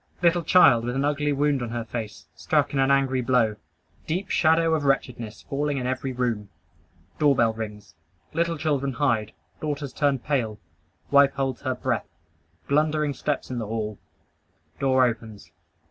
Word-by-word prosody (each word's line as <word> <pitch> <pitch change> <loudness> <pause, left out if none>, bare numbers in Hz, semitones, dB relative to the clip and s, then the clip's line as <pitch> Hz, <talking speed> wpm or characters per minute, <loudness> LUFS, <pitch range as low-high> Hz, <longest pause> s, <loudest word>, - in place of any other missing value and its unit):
Little 175 0 +4
child 150 -8 +5
with 120 +1 -3
an 135 +1 +1
ugly 150 0 0
wound 145 -1 +1
on 120 - -3
her 120 0 -3
face, 110 -2 -6
struck - - 0
in 135 - 0
an 135 0 +3
angry 135 -2 +2
blow. 120 -4 +2 0.5
Deep 185 +5 -2
shadow 165 0 +3
of 155 -2 0
wretchedness 125 -5 -1
falling 145 0 -2
in 125 - -3
every 130 +1 -2
room. 120 -5 -2 0.7
Doorbell 135 -7 +3
rings. 105 -2 -7 0.4
Little 170 0 0
children 140 -3 -1
hide. 115 -5 0 0.3
Daughters 145 -2 -4
turn 140 -2 +1
pale. 120 -5 -2 0.5
Wife 140 -1 +6
holds 135 -2 -2
her 130 -2 -1
breath. 125 -2 -2 0.6
Blundering 150 0 +1
steps 140 +1 -3
in 125 - -2
the 110 - -4
hall. 110 -2 -4 0.8
Door 130 -1 +4
opens. 110 -6 -5
135 Hz, 155 wpm, -25 LUFS, 115-145 Hz, 0.8 s, Wife